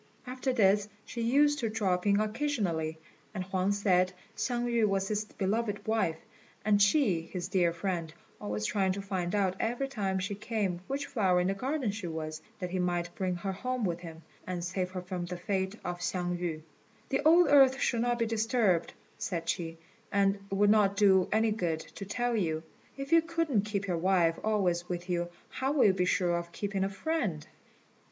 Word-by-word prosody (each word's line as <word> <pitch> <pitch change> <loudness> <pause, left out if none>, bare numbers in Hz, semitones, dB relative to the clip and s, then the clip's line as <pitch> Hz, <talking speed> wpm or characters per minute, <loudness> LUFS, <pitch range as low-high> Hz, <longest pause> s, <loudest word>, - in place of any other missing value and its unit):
After 255 +1 -2
this 205 -3 +3 0.2
she 235 - -5
used 290 +5 +3
to 230 - -1
drop 195 -4 0
in 200 0 +4
occasionally, 210 - -1 0.4
and 185 - -2
Huang 190 +1 0
said 185 -3 +2 0.2
Hsiang 240 -1 -1
yü 235 -2 +2
was 195 -1 0
his 210 0 -1
beloved 210 +1 -2
wife, 220 -8 +1 0.5
and 205 -1 +4
she 205 - +4
his 175 +2 -5
dear 180 -3 +3
friend, 170 -1 -3 0.3
always 105 +1 -3
trying 190 - +1
to 200 - -4
find 190 -1 -2
out 190 -2 +1
every 245 +4 -1
time 200 -8 -1
she 195 +2 -2
came 205 -4 -2
which 280 +1 -2
flower 190 -7 +2
in 180 - +1
the - - +1
garden 260 +2 -1
she 205 -3 -5
was, 155 -1 -5 0.2
that 180 -2 -5
he 185 - -1
might 175 -1 -1
bring 185 -2 -1
her 190 +3 -3
home 250 +4 -2
with 170 -2 -1
him, 165 -2 -10 0.2
and 180 -2 -3
save 185 +1 -2
her 185 -1 -6
from 180 -1 -4
the 180 0 -5
fate 190 +2 -2
of 175 0 -3
Hsiang 175 0 -1
yü. 160 -3 -3 0.5
"The 270 - +1
old 335 +3 +7
earth 270 -2 +7
should 235 -2 +1
not 240 0 +1
be 230 - +1
disturbed," 220 -5 +1 0.3
said 170 -3 -3
she, 165 -1 -2 0.3
"and 200 0 +2
it - - -5
would 205 +1 +4
not 200 -2 +3
do 190 -3 +5
any 220 +1 +3
good 170 -7 -1
to 200 - -9
tell 240 +4 -1
you. 160 -6 -1 0.3
If 275 +2 -6
you 330 0 +7
couldn't 325 -10 0
keep 200 -2 -2
your 175 -4 -1
wife 175 -2 +2
always 180 -5 +1
with 175 0 -4
you, 175 0 -1 0.2
how 265 +2 -1
will 285 - +4
you 195 - +6
be 180 -1 +1
sure 180 -2 +2
of 170 0 -6
keeping 200 +1 -2
a 195 - 0
friend?" 195 - -2
195 Hz, 195 wpm, -30 LUFS, 180-225 Hz, 0.5 s, old